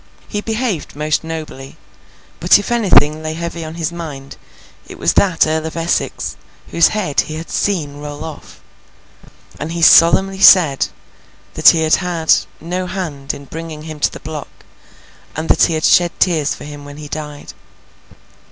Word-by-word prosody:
He 205 - -4
behaved 220 - -3
most 150 +2 -1
nobly, 155 -4 -8 0.6
but 175 +2 +5
if 205 +3 -5
anything 180 -9 +3
lay 155 0 -4
heavy 170 0 -5
on 160 +1 -8
his 165 -1 -3
mind, 150 -6 -8 0.5
it - - -11
was 85 +1 +1
that 185 -5 +3
Earl 160 0 -1
of 160 - -8
Essex, 165 +1 -2 0.4
whose 170 - +4
head 190 -10 0
he 155 - -7
had 160 +1 -8
seen 155 -8 -1
roll 145 +1 -7
off; 160 -2 -10 1.0
and 160 +3 -5
he 170 -1 -2
solemnly 190 +4 +5
said 160 -10 +6 0.7
that - - +6
he 160 -1 +2
had 155 - +3
had 175 -3 +1 0.3
no 180 +2 -4
hand 155 -7 -4
in 140 - -11
bringing 160 +1 -8
him 155 -1 -8
to - - +1
the - - -9
block, 155 -1 -7 0.9
and 160 +1 -4
that - - +5
he 165 - -1
had 155 - -1
shed 175 -1 +3
tears 160 -6 +1
for - - -12
him 145 0 -9
when 145 0 -11
he 150 -1 -9
died. 150 -1 -7
160 Hz, 170 wpm, -17 LUFS, 150-170 Hz, 1.0 s, said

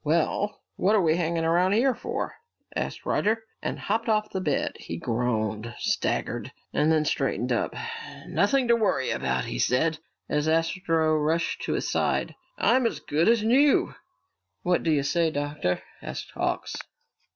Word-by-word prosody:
"Well, 170 +6 0
what 205 +4 +3
are 205 - +4
we 160 -1 +3
hanging 165 -1 0
around 175 +4 +3
here 255 +5 +3
for?" - - -4 0.4
asked - - -3
Roger, 220 +1 +1 0.2
and - - -3
hopped 225 +3 -1
off 215 -1 +1
the 190 - -2
bed. 150 -6 0
He 85 - -6
groaned, 115 0 -1
staggered, - - -1 0.2
and 150 +2 +3
then 155 -1 +3
straightened 125 -4 0
up. 120 - 0 0.5
"Nothing 255 +5 +2
to 235 - +7
worry 200 - +1
about," 65 0 -1
he - - -4
said, 155 - +2 0.3
as 150 +1 0
Astro 165 -1 +2
rushed 160 +2 0
to - - -1
his - - -1
side. - - 0 0.2
"I'm 255 -2 +4
as - - -4
good 160 +7 +1
as 230 -2 +4
new!" 270 +6 +4 0.7
"What 180 0 +2
do 165 - -1
you 145 -2 +2
say, 165 +4 +2
Doctor?" 145 -10 -2 0.2
asked - - -6
Hawks. - - -2
165 Hz, 160 wpm, -26 LUFS, 145-205 Hz, 0.7 s, to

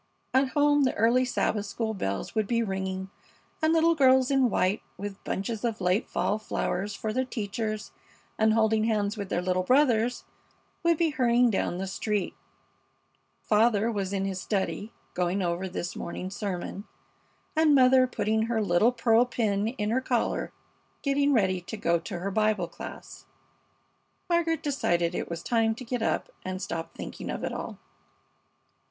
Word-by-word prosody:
At 265 +1 +3
home 290 0 +4
the 260 - +1
early 235 +4 +3
Sabbath 215 -4 -1
school 220 +1 -2
bells 100 - -3
would 215 -3 0
be 230 +1 +1
ringing, 190 -1 -3 0.5
and 315 0 +3
little 330 0 +4
girls 265 -3 +4
in 265 -3 +4
white, 190 0 +1 0.2
with 200 0 -7
bunches 210 +3 -3
of 230 -2 -1
late 180 +3 +1
fall 210 - 0
flowers 200 -1 -2
for 215 +1 -3
their 260 +2 +1
teachers, 215 -3 -4 0.4
and 220 0 +3
holding 220 -1 +3
hands 210 -2 0
with 200 -3 -5
their 175 - -1
little 185 0 +1
brothers, 245 +1 +2 0.6
would 335 -1 +3
be 330 -1 +2
hurrying 245 -3 +3
down 185 -3 -1
the 190 - -3
street. 200 +1 -2 1.1
Father 220 +1 +3
was 200 -3 -2
in 195 -1 -1
his 190 -1 -3
study, 205 +1 -2 0.2
going 180 +2 0
over 175 +1 -1
his 175 -1 -4
morning 185 +2 -5
sermon, 200 0 -4 0.7
and 310 -2 +5
mother 255 -1 +6
putting 220 -1 0
her 230 -1 0
little 205 +3 +3
pearl 230 -1 +4
pin 215 -4 0
in 220 -3 -2
her 255 +3 +1
collar, 245 -3 -1 0.5
getting 280 0 +2
ready 190 -7 +2
to 195 +5 -7
go 170 -4 +1
to 175 +2 -6
her 190 +3 -3
Bible 215 -3 +1
class. - - -10 1.0
Margaret 335 -2 +1
decided 175 - 0
it - - -3
was 170 0 -5
time 225 -2 +2
to 255 - -9
get 245 0 -2
up - - -1
and 185 0 -4
stop 165 -3 -5
thinking - - -7
of - - -4
it - - -2
all. - - -5
220 Hz, 165 wpm, -27 LUFS, 195-250 Hz, 1.1 s, mother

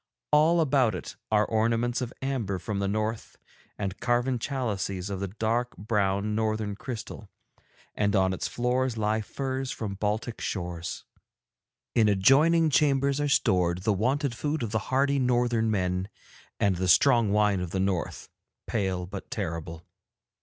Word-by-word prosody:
'All 160 +3 +5
about 130 - +2
it 90 - -7 0.2
are 105 0 +4
ornaments 115 +2 0
of 125 -1 -3
amber 120 -8 -1
from 100 +3 -4
the 100 - 0
North 110 +2 -3 0.4
and 100 -1 -4
carven 120 +1 +1
chalices 100 -8 -3
of 95 - -3
the 100 - -2
dark 115 +5 -2
brown 105 -1 0
Northern 110 -1 -1
crystal, 115 +2 -7 0.6
and 105 0 +1
on 95 -1 +3
its 95 - -3
floors 125 0 0
lie 110 0 +1
furs 130 +3 -4
from 105 -6 -4
Baltic 105 +4 -2
shores. 85 -3 -4 0.9
'In 110 -3 +4
adjoining 150 - +4
chambers 140 0 +2
are 145 - 0
stored 90 -7 +2
the 105 - +2
wonted 130 +6 0
food 150 +3 -2
of 110 - -3
the 110 - +1
hardy 140 +2 +2
Northern 120 -3 +2
men, 95 -2 -1 0.5
and 95 -3 +2
the 95 +1 -1
strong 115 - +5
wine 105 -2 +3
of 90 -1 -3
the 95 - -2
North, 95 -2 -2 0.4
pale 95 -5 -1
but 90 - -8
terrible. 80 0 -4
110 Hz, 150 wpm, -27 LUFS, 100-125 Hz, 0.9 s, All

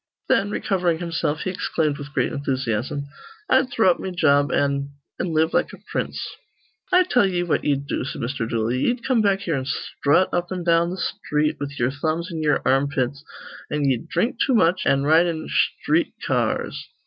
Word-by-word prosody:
Then, 200 - +3
recovering 180 -5 0
himself, 165 -3 -2
he 185 - -2
exclaimed 155 -5 -1
with 145 +1 -8
great - - 0
enthusiasm, 135 0 -2 0.5
"I'd 260 0 +4
throw 220 -6 +4
up - - -2
me 190 - -4
job 145 -5 +3
an' 140 0 0 0.3
an' - - -1
live 160 +1 +2
like - - +1
a - - -9
prince." - - -2 0.7
"I 365 0 +6
tell 250 - +3
ye 175 -2 0
what 175 - 0
ye'd 140 -1 0
do," 140 - -2
said 135 - -5
Mr. 120 -2 -3
Dooley. 115 +2 0
"Ye'd 240 - 0
come 255 -4 +3
back 200 -2 +2
here 175 -5 -2
an' 135 -3 -2
sthrut 145 +4 +1
up 175 +1 -1
an' 180 -1 -3
down 170 0 +3
th' 180 +2 -4
sthreet 150 -2 -1
with 145 0 -5
ye'er 120 +2 +1
thumbs 160 +5 -2
in 160 -1 -4
ye'er 150 -1 +1
armpits; 135 0 +1 0.5
an' 150 -1 -1
ye'd 130 -4 0
dhrink 240 - 0
too 260 - +2
much, 180 -3 +3
an' 135 0 +3
ride 160 +4 +5
in 160 -2 -3
sthreet - - +1
ca - - 0 0.2
ars. 70 +1 -4
155 Hz, 195 wpm, -23 LUFS, 140-180 Hz, 0.7 s, I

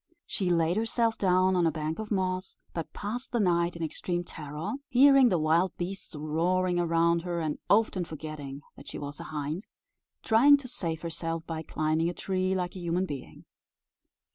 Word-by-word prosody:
She 190 -4 -2
laid 170 +1 +2
herself 225 0 +1
down 185 0 +3
on 175 -2 +3
a - - +2
bank 155 +3 -3
of 220 -1 -5
moss, 185 -2 -1 0.2
but 165 -2 -4
passed 240 +5 -5
the 240 - +1
night 170 -3 +2
in 170 - -4
extreme 175 +2 -2
terror, 155 +3 -6 0.2
hearing 270 0 +7
the 180 - +2
wild 165 +4 +2
beasts 180 -1 -5
roaring 175 +4 +1
around 170 0 +2
her, 175 0 -3
and 155 -2 -2
often 205 -3 +3
forgetting 155 -3 -7
that - - -14
she - - -6
was 145 +1 -7
a 170 - -7
hind, 155 +4 -4 0.6
trying 270 +6 +6
to 280 -2 -9
save 165 -9 -2
herself 165 0 -4
by 160 -1 -4
climbing 155 +1 0
a 175 - -5
tree 185 0 -1
like 180 -1 -2
a - - -6
human 175 +2 0
being. 140 -7 -8
175 Hz, 180 wpm, -29 LUFS, 160-190 Hz, 0.6 s, hearing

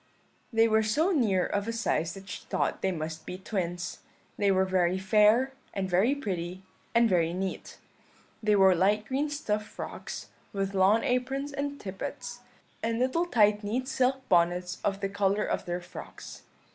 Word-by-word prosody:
"They 225 -1 +4
were 220 0 +4
so 295 - +2
near 215 - +2
of 205 +1 -2
a - - 0
size 225 -7 -1
that 195 0 -11
she 180 - -7
thought - - -1
they 190 - +1
must 160 -1 -5
be 180 - -6
twins. 180 -3 -3 0.4
They 200 - +2
were 190 -1 +3
very 185 -1 +2
fair, 210 +7 +4 0.2
and 195 -1 -1
very 190 +10 +3
pretty, 185 -7 -4 0.3
and 235 0 +6
very 170 -4 +2
neat. 190 +1 -4 0.6
They 215 -1 +3
wore 190 -1 +6
light 205 +4 +2
green 275 +5 -1
stuff 215 -8 -1
frocks, - - -7 0.2
with 195 0 -2
lawn 195 +4 +4
aprons 270 +3 -1
and 285 0 -3
tippets, 240 +5 -6 0.4
and 230 0 -1
little 260 +8 +1
tight 210 -6 +3
neat 245 +5 -2
silk 265 0 0
bonnets 180 +1 +2
of 195 -1 -1
the 195 - 0
colour 200 +1 +1
of - - -2
their 175 0 -3
frocks. 175 +1 -10
205 Hz, 170 wpm, -29 LUFS, 185-240 Hz, 0.6 s, and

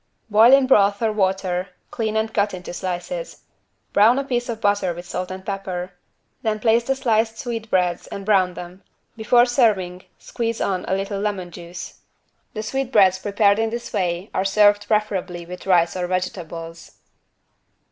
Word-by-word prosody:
= - - -46
Boil 220 +4 +7
in 275 0 +6
broth 205 -5 +4
or 220 - +2
water, 190 -2 -1 0.2
clean 220 -1 -2
and 220 0 -1
cut 205 -2 +1
into 180 -1 -8
slices. 190 - -5 0.5
Brown 220 +5 +5
a 275 - 0
piece 245 -3 -2
of 225 -2 -3
butter 205 -4 +1
with 175 +1 -9
salt 180 +1 -4
and 190 0 -8
pepper. 185 -2 -4 0.5
Then 215 -1 -1
place 230 +1 +3
the 270 - 0
sliced 225 -4 +1
sweetbreads 215 -8 -1
and 195 - -7
brown 190 -4 +2
them. 180 +2 -9 0.3
Before 240 +2 +4
serving 205 -8 +1
squeeze 230 -1 -4
on 185 -2 -1
a 190 - +1
little 195 +1 -3
lemon 200 -4 -3
juice. 170 +1 -9 0.6
The 215 - -3
sweetbreads 220 -6 +2
prepared 205 +1 +2
in 225 0 +1
this 235 +1 -6
way 180 +1 -2
are 190 - 0
served 205 +1 +3
preferably 195 -5 -1
with 180 +2 -9
rice 175 -2 +3
or 180 -1 -2
vegetables. 170 -2 -5
200 Hz, 165 wpm, -22 LUFS, 180-225 Hz, 0.6 s, Boil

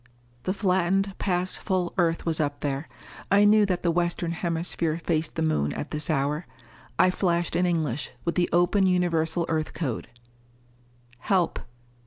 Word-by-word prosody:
The 185 - +1
flattened 195 0 +1
past 180 -1 -1
full 185 -3 -1
Earth 165 -2 +1
was 165 -2 0
up 145 -2 -1
there. 140 +1 -3 0.4
I 200 +1 +5
knew 210 0 +5
that 180 -2 -1
the 170 - +3
Western 175 +1 0
Hemisphere 170 -1 -1
faced 160 -1 0
the 160 - -1
Moon 75 - +1
at 150 - -5
this 150 +2 -2
hour. 150 +2 0 0.5
I 185 - +5
flashed 175 -2 0
in 180 +1 +2
English, 150 -7 -1 0.2
with 170 - 0
the 175 -1 +1
open 175 +3 +3
Universal 170 -2 +1
Earth 155 -1 -2
code: 135 -9 -3 1.2
_Help. 185 -3 +2
170 Hz, 155 wpm, -26 LUFS, 160-180 Hz, 1.2 s, I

